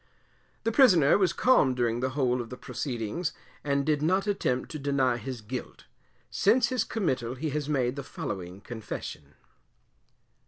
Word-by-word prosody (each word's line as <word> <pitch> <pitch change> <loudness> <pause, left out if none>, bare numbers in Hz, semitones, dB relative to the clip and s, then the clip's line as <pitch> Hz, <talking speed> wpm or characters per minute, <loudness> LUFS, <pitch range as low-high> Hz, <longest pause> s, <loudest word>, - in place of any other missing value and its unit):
The 225 - +1
Prisoner 185 - +6
was 185 -3 +3
calm 155 - +4
during 120 -1 0
the 130 +2 -2
whole 125 -3 +2
of 115 - -8
the 125 - -7
proceedings, 125 +4 -3 0.3
and 140 -1 0
did 150 -2 +1
not 185 +5 +2
attempt 130 -11 -1
to 155 - -5
deny 135 -3 +1
his 120 0 -6
guilt. 125 +4 -7 0.5
Since 235 +4 +3
his 255 -4 +1
committal 130 - -2
he 150 +3 -3
has 150 0 -2
made 130 -3 +1
the 140 - -4
following 95 -6 -6
Confession. 100 -10 -7
135 Hz, 155 wpm, -28 LUFS, 120-165 Hz, 0.5 s, Prisoner